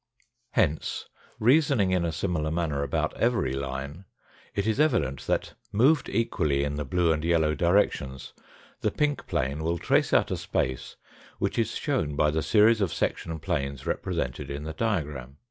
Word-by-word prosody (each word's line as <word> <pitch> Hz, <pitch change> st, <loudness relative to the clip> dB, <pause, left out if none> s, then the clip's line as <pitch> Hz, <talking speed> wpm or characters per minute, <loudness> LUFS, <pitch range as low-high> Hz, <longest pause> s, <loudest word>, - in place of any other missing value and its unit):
Hence, 80 Hz, -9 st, 0 dB, 0.3 s
reasoning 125 Hz, -5 st, +4 dB
in 90 Hz, -2 st, +2 dB
a 85 Hz, -, -1 dB
similar 80 Hz, -2 st, -1 dB
manner 80 Hz, -3 st, -1 dB
about 70 Hz, -1 st, -1 dB
every 115 Hz, -, +1 dB
line, 70 Hz, +6 st, -5 dB, 0.5 s
it 100 Hz, -, 0 dB
is 110 Hz, +4 st, 0 dB
evident 115 Hz, -, +1 dB
that, -, -, -1 dB, 0.2 s
moved 135 Hz, +9 st, +3 dB
equally 75 Hz, -12 st, 0 dB
in 70 Hz, 0 st, -2 dB
the 75 Hz, 0 st, -2 dB
blue 85 Hz, +3 st, +2 dB
and 80 Hz, 0 st, -3 dB
yellow 80 Hz, -2 st, +2 dB
directions, 85 Hz, -7 st, 0 dB, 0.5 s
the -, -, +1 dB
pink 150 Hz, -1 st, -1 dB
plane 70 Hz, +4 st, -1 dB
will 85 Hz, +1 st, 0 dB
trace -, -, +2 dB
out -, -, +3 dB
a -, -, 0 dB
space 65 Hz, -1 st, -2 dB, 0.4 s
which -, -, -1 dB
is -, -, 0 dB
shown 75 Hz, 0 st, -1 dB
by 75 Hz, +1 st, +3 dB
the 80 Hz, +1 st, 0 dB
series 110 Hz, +3 st, +4 dB
of 95 Hz, -5 st, +1 dB
section 80 Hz, -1 st, -2 dB
planes 70 Hz, -5 st, -3 dB
represented 60 Hz, 0 st, -2 dB
in 70 Hz, +1 st, -5 dB
the 80 Hz, +1 st, -5 dB
diagram. 75 Hz, -, -2 dB
80 Hz, 165 wpm, -27 LUFS, 70-105 Hz, 0.5 s, reasoning